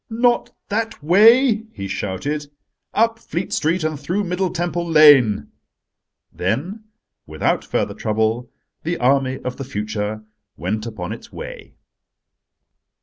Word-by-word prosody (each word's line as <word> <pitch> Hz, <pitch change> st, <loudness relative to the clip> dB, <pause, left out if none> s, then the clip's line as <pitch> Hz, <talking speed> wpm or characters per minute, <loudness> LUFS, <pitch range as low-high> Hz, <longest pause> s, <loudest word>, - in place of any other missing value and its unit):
"Not 240 Hz, +1 st, +2 dB, 0.2 s
that 220 Hz, -4 st, -2 dB
way," 220 Hz, -, +5 dB
he 100 Hz, -, -5 dB
shouted: 120 Hz, +11 st, -3 dB, 0.4 s
"up 225 Hz, +1 st, +2 dB
Fleet 175 Hz, -4 st, -4 dB
Street 165 Hz, +2 st, +1 dB
and 155 Hz, -2 st, -2 dB
through 180 Hz, +8 st, -1 dB
Middle 180 Hz, 0 st, -1 dB
Temple 175 Hz, 0 st, -2 dB
Lane." 140 Hz, -, +6 dB, 0.8 s
Then 160 Hz, -, -2 dB, 0.4 s
without -, -, 0 dB
further -, -, -1 dB
trouble 110 Hz, +3 st, -1 dB, 0.3 s
the 170 Hz, +1 st, -2 dB
army 130 Hz, +1 st, +2 dB
of 125 Hz, 0 st, -3 dB
the 135 Hz, -, -5 dB
future 105 Hz, -3 st, -4 dB, 0.3 s
went 105 Hz, +6 st, -3 dB
upon 95 Hz, -6 st, -6 dB
its -, -, -9 dB
way. -, -, -9 dB
150 Hz, 120 wpm, -21 LUFS, -, 0.8 s, Lane